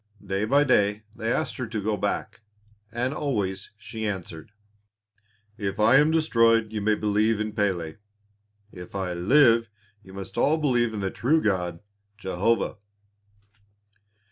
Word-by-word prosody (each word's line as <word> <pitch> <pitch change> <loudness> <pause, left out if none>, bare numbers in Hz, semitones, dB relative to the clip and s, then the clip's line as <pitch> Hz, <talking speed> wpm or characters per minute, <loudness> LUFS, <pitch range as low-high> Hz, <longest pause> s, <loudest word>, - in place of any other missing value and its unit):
Day 95 +2 -1
by 140 +6 +4
day 105 -6 +2
they 115 +1 -2
asked 155 - -1
her 125 -3 -4
to 110 -1 -4
go 105 +1 0
back, 105 +3 -3 0.5
and 125 +4 -2
always 100 -11 -2
she 110 0 -5
answered, 90 -3 -6 1.1
"If 100 -1 -3
I 110 +5 +6
am 150 +2 +5
destroyed 115 -8 +3
you 105 - -2
may 105 +1 +2
believe 105 +1 +1
in 110 0 -3
Pélé; 90 -6 -1 0.7
if 90 +1 -11
I 95 -2 -2
live 115 +5 +4 0.3
you 95 -2 -15
must 95 -1 -6
all 155 +2 +3
believe 120 -7 +1
in 105 - -3
the 95 -1 -2
true 150 +7 +2
God, 90 - -1 0.4
Jehovah." 105 +4 0
110 Hz, 140 wpm, -25 LUFS, 95-120 Hz, 1.1 s, I